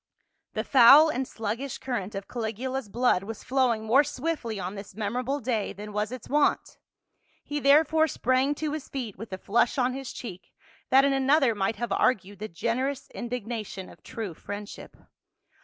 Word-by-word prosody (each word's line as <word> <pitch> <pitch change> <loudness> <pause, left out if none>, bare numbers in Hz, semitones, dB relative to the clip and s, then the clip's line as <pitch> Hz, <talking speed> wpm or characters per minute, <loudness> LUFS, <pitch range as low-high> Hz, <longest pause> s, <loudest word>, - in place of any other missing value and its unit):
The - - -1
foul 275 +5 +8
and 260 -2 -2
sluggish 225 +5 -4
current 220 -6 -4
of 195 0 -5
Caligula's 240 +1 -4
blood 240 -3 +2
was 215 +2 -8
flowing 250 -4 +1
more 260 +6 +5
swiftly 265 -6 -3
on 185 +1 -4
this 200 -1 -9
memorable 245 +6 -2
day 225 -5 -2
than 210 +1 -9
was 210 +2 -1
its 255 -3 -8
wont, 295 +1 +1 0.6
he 295 0 -3
therefore 315 +3 +4
sprang 260 +1 +1
to 300 0 -3
his 305 -3 -6
feet 245 -7 -5
with 220 +2 -9
a 190 - -4
flush 235 +7 +1
on 250 -1 +2
his 270 -1 -6
cheek 185 -7 -9 0.4
that 270 +1 +6
in 280 - +3
another 270 -1 +3
might 205 +1 -1
have 235 0 -4
argued 200 -5 +1
the 215 - -4
generous 245 +8 -2
indignation 230 -5 -5
of - - -16
true 215 -6 -6
friendship. 205 +5 -8
240 Hz, 170 wpm, -27 LUFS, 210-270 Hz, 0.6 s, foul